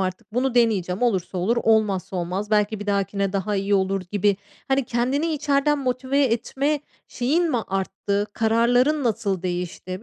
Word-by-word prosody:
artık 190 +3 -4
bunu 255 0 +1
deneyeceğim 210 -5 +2
olursa 190 -6 0
olur, 220 +7 +1
olmazsa 210 -5 +1
olmaz 185 +4 -3
belki 210 0 +1
bir 205 - -6
dahakine 200 -1 0
daha 200 +1 -1
iyi 200 +1 +1
olur 195 0 +1
gibi, 205 -1 +2 0.3
hani, 270 0 +2
kendini 250 +6 0
içeriden 295 0 +1
motive 260 +1 0
etme 270 +5 0 0.3
şeyin 315 +8 +1
mi 250 - +1
arttı? 195 +1 -2
Kararların 245 +7 +2
nasıl 210 -5 -1
değişti? 180 +1 -4
215 Hz, 150 wpm, -23 LUFS, 195-250 Hz, 0.3 s, deneyeceğim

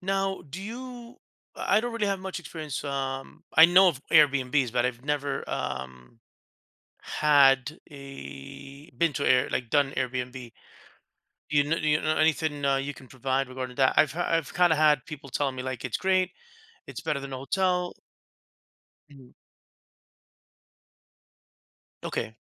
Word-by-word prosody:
Now, 195 0 -1
do 165 +8 -7
you 240 +2 -9 0.4
I 205 - +2
don't 240 +1 -4
really 220 -3 -1
have 195 -1 0
much 190 0 -5
experience, 155 -6 -6
um, 135 -1 -5
I 160 - +9
know 185 +2 +6
of 145 -7 -2
Airbnbs, 140 -5 +3
but 120 0 +2
I've 125 0 -5
never, 145 -1 -2
um, 65 - -6 0.8
had 145 -1 +3
a 135 - -10
been 170 -2 +1
to 140 - -2
Air 130 -1 +4
like, 120 -2 -2
done 140 +1 +2
Airbnb. 125 -1 -3 1.0
You 145 -1 +3
kn 160 +3 -1
you 150 0 +2
know 155 0 0
anything, 155 -2 +1
uh, 140 -1 +3
you 140 +1 -3
can 130 -1 -15
provide 130 +1 -1
regarding 130 -1 -6
that? 135 -1 +3
I've 155 - +4
ha 175 +2 -2
I've 165 -4 0
kinda 175 -2 +4
had 150 -3 +4
people 150 -3 -9
telling 135 0 -1
me, 125 - -4
like, 130 -1 -5
"It's 125 - -1
great, 185 -1 +1 0.6
it's - - -7
better 140 - -1
than 140 -1 -7
a - - -4
hotel." 180 +5 0 1.2
Mhm. 135 -3 -16 2.7
Okay. 110 - -3
145 Hz, 145 wpm, -27 LUFS, 130-165 Hz, 2.7 s, I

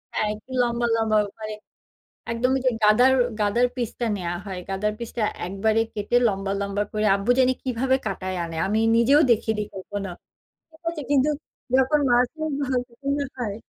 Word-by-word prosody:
হ্যাঁ, 215 - +1
একটু 215 +5 -16
লম্বা, 240 0 0
লম্বা 220 -1 +2 0.2
মানে 215 0 -5 0.8
একদম 235 +2 +1
ওইযে 255 -1 +2
গাদার 240 +5 +6 0.3
গাদার 220 +4 +3
পিসটা 240 -1 -3
নেওয়া 175 -2 -3
হয়, 190 -2 -5
গাদার 205 +2 0
পিসটা 235 -1 -4 0.2
একবারে 215 +4 +1
কেটে 210 +3 0
লম্বা, 195 -1 -2
লম্বা 200 +1 -1
করে 215 0 0
আব্বু 200 +5 -1
জানি 255 0 +5
কিভাবে 260 +1 +1
কাটায় 185 -2 -3
আনে। 165 -1 -6
আমি 210 +3 +1 0.2
নিজেও 265 +6 +5
দেখিনি 220 -1 +2
কখনো। 195 +1 -5 0.6
ঠিক 320 0 -21
আছে? 315 -3 -6
কিন্তু 285 0 +4 0.5
যখন 265 +3 +4
মাছই 250 +6 +2 0.2
ভালো 265 -2 0
রকমের 280 +3 -3
হয় 220 -5 -2
230 Hz, 160 wpm, -24 LUFS, 205-255 Hz, 0.8 s, গাদার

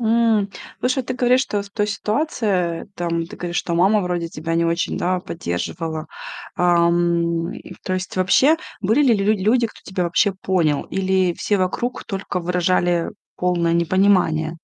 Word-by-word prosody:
М. 225 -3 +2 0.3
Слушай, 255 +1 0
ты 255 - -3
говоришь, 250 +1 +3
что 205 -5 -2
в 200 - -13
той 210 0 -1
ситуации, 210 - -1
там, 170 -1 -1
ты - - -11
говоришь, 175 -1 -4
что 170 - -1
мама 195 +5 +4
вроде 175 -2 -2
тебя 165 +1 -4
не 170 - +2
очень, 170 +1 -1
да, 180 0 0
поддерживала. 160 - -4 0.5
Ам, 170 -1 +2
и 185 - -10
то 185 - -1
есть 185 0 -4
вообще, 260 - +4 0.2
были 220 +8 +3
ли 255 -5 +5
лю 200 -1 0
людь 205 - -6
люди, 230 +5 +3
кто - - -16
тебя 190 -1 -2
вообще 185 +4 +2
понял, 180 -6 0
или 190 -1 +1
все 205 +3 0
вокруг 190 +7 -2
только 195 -2 -4
выражали 175 0 +1 0.3
полное 175 -2 +1
непонимание? 170 -2 +2
185 Hz, 165 wpm, -21 LUFS, 170-205 Hz, 0.5 s, ли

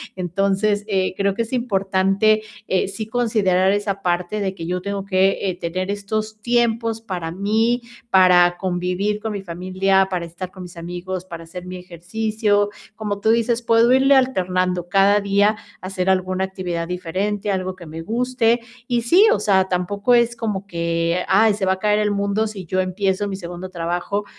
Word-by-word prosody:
Entonces, 195 +3 0
eh, 190 -3 0
creo 200 0 0
que 230 - 0
es 230 +3 -9
importante, 200 -2 +2 0.3
eh, 190 - +1
sí 200 +3 -5
considerar 210 -5 +2
esa 200 -1 -1
parte, 180 +3 -1
de 190 -1 -2
que 165 - -6
yo 180 +1 -2
tengo 200 0 -4
que, 190 0 +2
eh, - - -1
tener 185 +3 -2
estos 215 +1 -4
tiempos 230 -1 +1
para 180 -7 -4
mí, 220 +6 +1 0.3
para 180 -2 +5
convivir 185 +3 -1
con 220 0 -4
mi 200 - -5
familia, 185 +2 +1
para 180 -2 -2
estar 175 +2 -7
con 185 -1 -10
mis 180 0 -11
amigos, 180 +2 -5
para 170 -3 -8
hacer 175 +2 -9
mi 185 0 -6
ejercicio. 205 +4 -1 0.3
Como 205 -2 -3
tú 220 - +1
dices, 230 +1 +2
puedo 230 +1 +4
irle 270 +2 +5
alternando 185 -8 +1
cada 200 +2 +4
día, 200 +2 +2 0.3
hacer 185 0 -2
alguna 185 0 +1
actividad 180 -3 -4
diferente, 190 +4 -2
algo 185 -1 -2
que 180 -2 -12
me 160 +1 -7
guste. 235 +4 +1 0.3
Y 240 -2 0
sí, 365 - +6
o - - +2
sea, 190 -2 +3
tampoco, 200 +6 +1
es 235 0 +3
como 210 -4 -3
que: 170 0 -1
"Ay, 215 +2 +4
se 200 -1 -2
va 190 - +4
a 190 - -7
caer 210 +1 +2
el 210 0 +1
mundo", 200 +2 0
si 200 -4 -8
yo 185 +3 0
empiezo 190 +2 -1
mi 195 - -4
segundo 180 0 -7
trabajo, 175 +4 -2
195 Hz, 180 wpm, -21 LUFS, 180-215 Hz, 0.3 s, sí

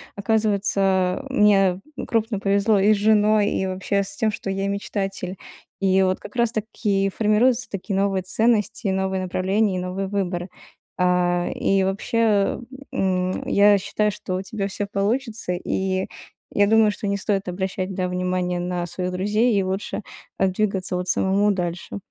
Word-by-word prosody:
оказывается, 200 -1 +1
мне 200 -7 +4 0.3
крупно 225 -2 0
повезло 200 +2 +2
и 205 +2 +5
с - - 0
женой, 210 0 +3
и 190 - -1
вообще 195 +1 -1
с 200 0 -4
тем, 220 -1 +1
что 205 - -5
я 195 +1 -1
мечтатель. 195 -2 -3 0.4
И 190 -1 +3
вот 185 0 +1
как - - -11
раз 235 -2 +2
таки 210 -3 -1
формируются 230 +3 +2
такие 195 +1 -4
новые 195 -1 +1
ценности, 220 +2 +1
новые 190 0 -1
направления 190 +2 0
и - - -1
новые 185 +2 -3
выборы. 185 -2 -2 0.5
А, 180 -1 +2
и 195 -1 +2
вообще, 200 +1 +1 0.3
м, 185 -1 -1
я 205 0 +5
считаю, 210 +2 0
что 185 -1 -5
у 185 - -2
тебя 195 0 -3
всё 200 +1 -3
получится, 215 0 -1
и 190 +1 -1 0.5
я 205 0 +3
думаю, 220 0 +5
что 205 - -5
не 200 0 0
стоит 195 -1 -1
обращать, 190 +1 -3
да, 185 0 -1
внимание 180 0 -1
на 175 0 -2
своих 180 +1 -4
друзей 210 +5 +1
и 195 - +2
лучше 190 +2 -3 0.3
там 190 -1 +2
двигаться 190 -2 -1
вот 180 0 -3
самому 200 +3 +2
дальше. 175 0 -3
195 Hz, 155 wpm, -23 LUFS, 185-210 Hz, 0.5 s, и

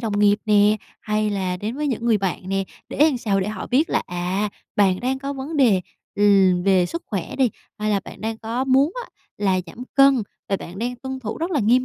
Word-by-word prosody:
đồng 215 -4 -1
nghiệp 205 0 +4
nè, 210 0 +4 0.2
hay 215 0 0
là 185 -2 -1
đến 215 +7 -4
với 300 - -1
những 240 -4 -2
người 230 -3 +3
bạn 190 -1 -3
nè. 195 0 0 0.2
Để - - -7
làm 270 -5 -1
sao? 200 -4 0
Để 190 - -2
họ 215 -3 -5
biết 290 +7 +2
là, - - +1
à, 180 +4 -1 0.3
bạn 190 -3 +3
đang 260 +2 -1
có 275 +1 -4
vấn 280 +3 -5
đề, 230 -10 +4 0.3
ừm, 195 -3 +4
về 185 -2 +3
sức 335 - -5
khỏe 195 -6 -4
đi, 260 -4 +3 0.3
hay 215 0 -1
là 200 -1 +2
bạn - - -11
đang 220 0 -3
có 235 +3 -2
muốn 270 +5 +3
á - - -12 0.3
là 190 -2 +2
giảm 240 +9 -9
cân 275 -3 +5 0.3
và 195 - +1
bạn 185 +1 -9
đang 245 +2 -2
tuân 265 +1 -6
thủ 220 -2 -5
rất 335 +3 -2
là 300 -7 +1
nghiêm 245 +4 +3
215 Hz, 240 wpm, -22 LUFS, 195-260 Hz, 0.3 s, cân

